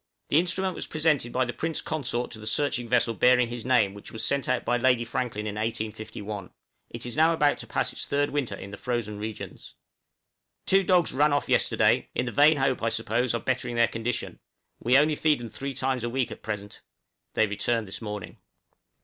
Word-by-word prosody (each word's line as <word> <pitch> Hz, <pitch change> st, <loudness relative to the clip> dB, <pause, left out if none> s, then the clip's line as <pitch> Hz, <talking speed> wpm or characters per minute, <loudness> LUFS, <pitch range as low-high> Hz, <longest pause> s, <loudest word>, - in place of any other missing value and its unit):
The 150 Hz, -, +5 dB
instrument 185 Hz, +2 st, 0 dB
was -, -, -6 dB
presented 150 Hz, -6 st, +1 dB
by 130 Hz, +1 st, +1 dB
the 120 Hz, -, -4 dB
Prince 160 Hz, 0 st, -2 dB
Consort 125 Hz, -5 st, -2 dB
to 110 Hz, -, -8 dB
the 110 Hz, -, -8 dB
searching 125 Hz, -1 st, 0 dB
vessel 120 Hz, -2 st, +3 dB
bearing 125 Hz, +1 st, +4 dB
his 120 Hz, -1 st, -5 dB
name 120 Hz, -6 st, +3 dB
which 100 Hz, -, -11 dB
was 110 Hz, -, -2 dB
sent 140 Hz, -2 st, 0 dB
out 125 Hz, -1 st, 0 dB
by 120 Hz, -, +2 dB
Lady 120 Hz, -1 st, +3 dB
Franklin 115 Hz, -3 st, -3 dB
in 105 Hz, -, -3 dB
1851; 110 Hz, -2 st, -4 dB, 0.4 s
it 120 Hz, +1 st, -6 dB
is 120 Hz, -, -5 dB
now 160 Hz, +2 st, +4 dB
about 150 Hz, -3 st, +2 dB
to -, -, -8 dB
pass -, -, -1 dB
its -, -, -5 dB
third 145 Hz, 0 st, +1 dB
winter 135 Hz, -8 st, -1 dB
in 100 Hz, 0 st, -9 dB
the 100 Hz, -, -7 dB
frozen 115 Hz, -4 st, -3 dB
regions. 110 Hz, 0 st, -7 dB
{SNOW -, -, -55 dB
CRYSTALS.} -, -, -57 dB
Two 195 Hz, 0 st, +4 dB
dogs 180 Hz, -2 st, +3 dB
ran 145 Hz, +2 st, +3 dB
off 145 Hz, -, 0 dB
yesterday, -, -, +2 dB
in 125 Hz, -, 0 dB
the 120 Hz, -, -3 dB
vain 150 Hz, +4 st, +5 dB
hope, 135 Hz, -1 st, +1 dB
I 115 Hz, -, +1 dB
suppose, 115 Hz, +2 st, 0 dB
of 115 Hz, -, -4 dB
bettering 125 Hz, -2 st, -1 dB
their 115 Hz, 0 st, +4 dB
condition, 115 Hz, +1 st, -4 dB, 0.4 s
we 125 Hz, +3 st, +4 dB
only 150 Hz, +2 st, +4 dB
feed 150 Hz, -2 st, +2 dB
them 120 Hz, -1 st, -7 dB
three 140 Hz, +4 st, -5 dB
times 130 Hz, -1 st, -1 dB
a 120 Hz, -, -1 dB
week 130 Hz, +1 st, -1 dB
at -, -, -8 dB
present; 105 Hz, -2 st, -6 dB, 0.5 s
they 110 Hz, -, +4 dB
returned 110 Hz, +2 st, -1 dB
this 95 Hz, -, -7 dB
morning. 105 Hz, -2 st, -6 dB
120 Hz, 215 wpm, -27 LUFS, 110-140 Hz, 0.5 s, The